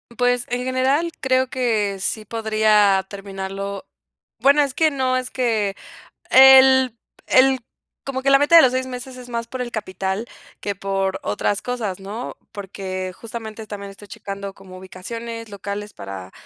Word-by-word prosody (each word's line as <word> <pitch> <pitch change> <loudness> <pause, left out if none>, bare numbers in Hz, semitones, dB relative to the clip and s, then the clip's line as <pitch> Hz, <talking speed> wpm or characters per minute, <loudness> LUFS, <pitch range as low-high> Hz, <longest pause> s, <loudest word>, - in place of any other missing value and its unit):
Pues, 245 0 +1
en 245 +1 -2
general, 265 +6 +1
creo 260 0 +2
que 220 -6 0
sí 215 +3 -2
podría 215 -3 +2
terminarlo. 195 0 -6 0.5
Bueno, 280 +2 +5
es 280 -3 0
que 315 +3 +3
no, 260 -2 0
es 255 -1 -3
que 220 -6 0 0.5
el 265 -1 +7 0.3
el 265 0 +5 0.5
como 265 -1 -4
que 275 - +2
la 275 - +7
meta 290 +4 +5
de 325 - +10
los 250 - +4
6 260 0 -1
meses, 255 0 -7
es 250 -1 -11
más 235 -1 -3
por 255 +1 -7
el 245 -1 -3
capital 195 0 -3 0.3
que 205 - -3
por 195 0 -2
otras 150 - -1
cosas, 225 -7 -3
¿no?, 210 +5 -6 0.2
porque 190 -2 -5
justamente 225 -1 -8
también 200 -1 -7
estoy 200 +1 -14
checando 200 0 -7
como 185 -2 -13
ubicaciones 230 +5 -7
locales 200 +1 -6
para 95 -1 -8
220 Hz, 155 wpm, -21 LUFS, 195-255 Hz, 0.5 s, de